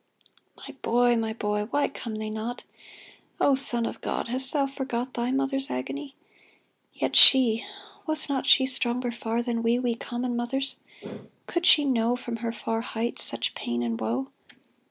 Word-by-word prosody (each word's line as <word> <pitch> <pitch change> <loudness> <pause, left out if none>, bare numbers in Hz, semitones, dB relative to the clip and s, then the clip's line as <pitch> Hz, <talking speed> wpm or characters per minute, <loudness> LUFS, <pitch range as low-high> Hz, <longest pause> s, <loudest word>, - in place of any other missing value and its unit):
My - - -11
boy! 240 +1 +2
my 225 -1 -2
boy! 210 -1 -2
— - - -25
Why 285 +2 +1
come 230 -5 -7
they 215 0 -5
not? 220 +3 -5 0.8
O 280 - +3
Son 240 -3 +2
of - - -6
God! - - -3
hast 260 +2 +1
Thou 285 -2 +1
forgot 260 -2 -4
Thy 240 +1 -2
Mother's 270 +1 -1
agony? 275 - -5 0.8
Yet - - -2
she. 235 -4 +7 0.4
Was 310 -1 +7
she - - +1
not 265 - -2
stronger 250 -2 +2
far 235 0 -3
than 235 -1 -2
we, 230 +1 +2
We 245 -1 -1
common 240 +1 -4
mothers? 270 +3 -2 0.7
Could 345 +1 -1
she 295 -1 +7
know 240 -3 +1
From 240 -1 -6
her 230 0 -3
far 225 0 -3
heights 230 0 -3
such - - -1
pain 120 0 -3
and 115 -1 -3
woe 120 +5 -3
240 Hz, 170 wpm, -26 LUFS, 225-265 Hz, 0.8 s, she